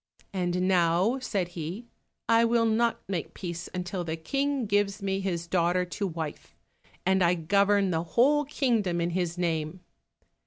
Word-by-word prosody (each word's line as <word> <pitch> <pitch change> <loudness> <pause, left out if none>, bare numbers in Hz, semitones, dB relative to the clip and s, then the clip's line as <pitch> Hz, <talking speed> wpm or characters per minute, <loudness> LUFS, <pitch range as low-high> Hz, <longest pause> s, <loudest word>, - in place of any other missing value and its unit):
"And 180 -1 0
now," 185 +6 +3
said 195 -8 -2
he, 175 +7 -6 0.4
"I 230 0 +5
will 230 0 +3
not 230 +1 +1
make 185 -4 -4
peace 175 -1 -5
until 180 0 -3
the 165 -1 -3
King 275 - -1
gives 205 0 0
me 195 0 0
his 175 -3 -2
daughter 175 +1 +1
to 195 +3 -3
wife, 160 -3 -6 0.5
and 190 +1 +3
I 175 0 +4
govern 200 +3 +2
the 160 -1 0
whole 265 - +3
kingdom 230 - 0
in 170 +1 0
his 175 -1 -2
name." 165 0 -2
185 Hz, 155 wpm, -28 LUFS, 170-210 Hz, 0.5 s, I